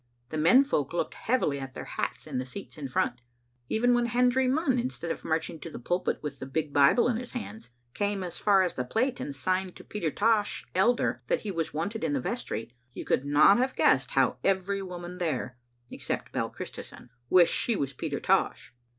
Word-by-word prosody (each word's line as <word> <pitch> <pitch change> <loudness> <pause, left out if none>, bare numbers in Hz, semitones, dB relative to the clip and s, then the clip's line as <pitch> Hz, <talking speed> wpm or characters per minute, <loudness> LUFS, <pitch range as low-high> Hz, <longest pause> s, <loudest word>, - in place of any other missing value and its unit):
The 155 - -4
men 180 - +6
folk 150 - -1
looked 175 - -1
heavily 205 - 0
at 135 -1 -7
their - - -6
hats - - -4
in - - -3
the 130 - -3
seats 200 +10 -9
in 145 -3 -5
front. 120 -1 -1 0.5
Even 245 +2 +3
when 240 0 +2
Hendry 250 +2 +3
Munn, 265 -1 +2
instead 235 -9 -3
of - - -5
marching 160 0 -2
to 165 - -7
the - - -8
pulpit 175 +9 -1
with 140 -2 -5
the 130 - -6
big 150 +1 -2
Bible 145 - +5
in 240 -2 +1
his 250 +1 -7
hands, 220 - -7 0.2
came 200 -2 -1
as 175 -1 -5
far 195 -2 +4
as 180 - -1
the 125 - -2
plate 245 - 0
and 140 - -5
signed 185 +5 -1
to - - -11
Peter 180 -7 -3
Tosh, 210 +4 +1
elder, 235 +6 +2
that - - +1
he 205 - -4
was 165 -3 -2
wanted 200 +7 -3
in 155 -3 0
the 140 - +1
vestry, 120 -2 -4 0.2
you - - -6
could - - +1
not 145 +9 +5
have 260 +1 0
guessed 135 -1 +3
how 130 -2 +3
every 195 +1 +1
woman 180 -1 -7
there, 130 -7 -2 0.3
except - - -4
Bell - - -1
Christison, - - -9 0.2
wished 180 -2 +6
she 235 - +1
was 140 -7 -2
Peter - - -3
Tosh. - - +1
180 Hz, 210 wpm, -28 LUFS, 145-225 Hz, 0.5 s, men